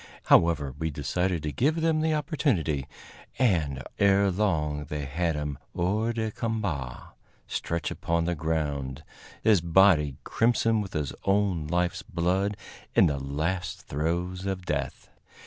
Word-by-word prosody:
However, 75 Hz, -5 st, +4 dB
we 80 Hz, -, -1 dB
decided 80 Hz, +4 st, -1 dB
to 75 Hz, -, -2 dB
give 150 Hz, -, +1 dB
them 160 Hz, -1 st, +2 dB
the 160 Hz, 0 st, +2 dB
opportunity, 115 Hz, -, 0 dB, 0.5 s
and 80 Hz, -, +1 dB, 0.2 s
ere 100 Hz, 0 st, +4 dB
long 75 Hz, -7 st, 0 dB
they 75 Hz, 0 st, -4 dB
had 80 Hz, +4 st, -1 dB
him 75 Hz, -2 st, -3 dB, 0.2 s
hors 105 Hz, +7 st, 0 dB
de 110 Hz, -1 st, -1 dB
combat, 95 Hz, -, -3 dB, 0.4 s
stretched 85 Hz, -1 st, -3 dB
upon 85 Hz, 0 st, -1 dB
the 90 Hz, -, 0 dB
ground, 75 Hz, -3 st, -2 dB, 0.4 s
his 105 Hz, -6 st, +5 dB
body 85 Hz, -4 st, +4 dB
crimson 115 Hz, -1 st, +2 dB
with 95 Hz, -, -7 dB
his 75 Hz, -3 st, -2 dB
own 95 Hz, -6 st, +1 dB
life's 90 Hz, +3 st, 0 dB
blood, 95 Hz, +1 st, 0 dB, 0.4 s
in -, -, +7 dB
the 75 Hz, -4 st, +1 dB
last 85 Hz, +7 st, -2 dB
throes 90 Hz, +5 st, -2 dB
of 95 Hz, -2 st, -3 dB
death. 70 Hz, -4 st, -3 dB
85 Hz, 135 wpm, -27 LUFS, 75-100 Hz, 0.5 s, in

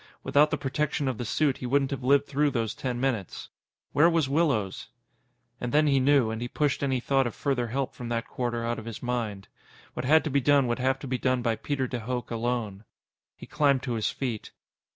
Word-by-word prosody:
Without 150 Hz, +2 st, +4 dB
the -, -, -1 dB
protection 145 Hz, +1 st, -1 dB
of 130 Hz, -4 st, -2 dB
the 120 Hz, -, -3 dB
suit, 140 Hz, +3 st, +1 dB
he 125 Hz, -, -5 dB
wouldn't 135 Hz, +1 st, +1 dB
have 135 Hz, -2 st, -4 dB
lived 140 Hz, +2 st, +4 dB
through 145 Hz, +1 st, +1 dB
those 115 Hz, -5 st, -1 dB
ten 125 Hz, -2 st, -3 dB
minutes. 120 Hz, -8 st, -2 dB, 0.4 s
Where 160 Hz, +4 st, +5 dB
was 165 Hz, -4 st, +2 dB
Willows? 135 Hz, -, 0 dB, 0.7 s
And 125 Hz, -, -3 dB
then 150 Hz, +1 st, +4 dB
he 140 Hz, -2 st, +3 dB
knew, 130 Hz, -4 st, +3 dB
and 110 Hz, +1 st, -4 dB
he 120 Hz, -, -2 dB
pushed 145 Hz, +3 st, 0 dB
any 135 Hz, -2 st, +1 dB
thought 135 Hz, +1 st, +1 dB
of 115 Hz, -, -6 dB
further 130 Hz, -4 st, -1 dB
help 130 Hz, +3 st, -2 dB
from 120 Hz, -1 st, -7 dB
that 115 Hz, 0 st, -2 dB
quarter 120 Hz, -2 st, -3 dB
out 120 Hz, 0 st, -2 dB
of 110 Hz, -, -10 dB
his 115 Hz, +1 st, -7 dB
mind. 115 Hz, -6 st, -3 dB, 0.5 s
What -, -, -4 dB
had 155 Hz, +4 st, +5 dB
to 155 Hz, -, -3 dB
be 140 Hz, +1 st, +2 dB
done 140 Hz, 0 st, +4 dB
would 120 Hz, +1 st, -1 dB
have 130 Hz, +1 st, +1 dB
to 140 Hz, -, -6 dB
be 130 Hz, -1 st, -2 dB
done 130 Hz, -1 st, +1 dB
by 115 Hz, -1 st, +1 dB
Peter 140 Hz, +2 st, -2 dB
de 125 Hz, -1 st, -4 dB
Hooch 120 Hz, +1 st, -4 dB
alone. 115 Hz, -3 st, -2 dB, 0.5 s
He -, -, -11 dB
climbed 140 Hz, -3 st, +2 dB
to 125 Hz, -, -2 dB
his 110 Hz, -2 st, 0 dB
feet. 120 Hz, -6 st, -4 dB
130 Hz, 225 wpm, -27 LUFS, 120-140 Hz, 0.7 s, Where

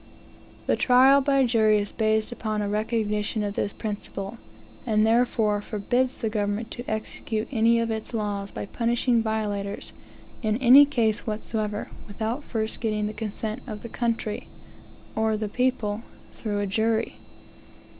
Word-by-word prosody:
The -, -, +2 dB
trial 265 Hz, +2 st, +6 dB
by 275 Hz, -1 st, +3 dB
jury 220 Hz, -3 st, +4 dB
is 205 Hz, -1 st, -2 dB
based 220 Hz, 0 st, +1 dB
upon 215 Hz, -3 st, -2 dB
a -, -, -1 dB
recognition 210 Hz, 0 st, -1 dB
of 205 Hz, -1 st, -2 dB
this 205 Hz, -, -1 dB
principle, 205 Hz, 0 st, -5 dB, 0.4 s
and 215 Hz, -1 st, +2 dB
therefore 225 Hz, -2 st, +2 dB
forbids 245 Hz, +5 st, -1 dB
the 225 Hz, -, 0 dB
government 210 Hz, +1 st, -2 dB
to 240 Hz, -, -6 dB
execute 215 Hz, 0 st, -3 dB
any 230 Hz, -1 st, +4 dB
of 230 Hz, 0 st, 0 dB
its 220 Hz, -1 st, -4 dB
laws, 205 Hz, -3 st, -2 dB
by 105 Hz, -, -5 dB
punishing 235 Hz, -, +1 dB
violators, 205 Hz, -2 st, -3 dB, 0.5 s
in 215 Hz, -2 st, +1 dB
any 265 Hz, +3 st, +8 dB
case 230 Hz, -7 st, 0 dB
whatever, 215 Hz, -1 st, -3 dB, 0.2 s
without 220 Hz, +7 st, -3 dB
first 220 Hz, -4 st, -3 dB
getting 215 Hz, -2 st, 0 dB
the 210 Hz, -, -3 dB
consent 215 Hz, +2 st, -4 dB
of 210 Hz, -3 st, -6 dB
"the 235 Hz, -, -6 dB
country," 230 Hz, -2 st, -2 dB, 0.7 s
or 220 Hz, -1 st, +1 dB
the 215 Hz, 0 st, -2 dB
people, 230 Hz, -2 st, 0 dB, 0.3 s
through 205 Hz, -2 st, -2 dB
a -, -, 0 dB
jury. 220 Hz, +3 st, 0 dB
220 Hz, 145 wpm, -26 LUFS, 210-235 Hz, 0.7 s, any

